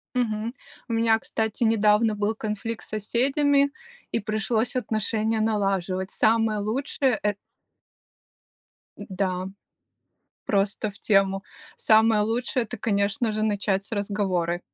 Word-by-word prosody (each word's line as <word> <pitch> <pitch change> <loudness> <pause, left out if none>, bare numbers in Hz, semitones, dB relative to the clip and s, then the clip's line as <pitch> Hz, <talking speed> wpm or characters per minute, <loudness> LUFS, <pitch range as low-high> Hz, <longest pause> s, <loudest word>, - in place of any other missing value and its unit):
Мгм. 225 -2 -1 0.4
У - - -4
меня, 225 -1 +3
кстати, 220 +1 -2
недавно 215 0 +3
был 210 +1 -1
конфликт 220 +1 -4
с - - -16
соседями 275 +6 +2 0.4
и 230 - +1
пришлось 220 +3 -1
отношения 220 -1 0
налаживать. 195 -3 0
Самое 225 -1 +2
лучшее- 255 +3 0
э 210 0 +1 1.6
Д - - -9
да, 185 -1 -2 1.0
просто 200 +1 0
в 200 - -17
тему. 195 -2 +2 0.3
Самое 220 0 +4
лучшее- 235 +3 0
это, 240 +3 -7
конечно 205 +1 0
же, 215 0 -2
начать 200 -2 0
с - - -11
разговора, 195 -4 -1
215 Hz, 120 wpm, -25 LUFS, 200-225 Hz, 1.6 s, Самое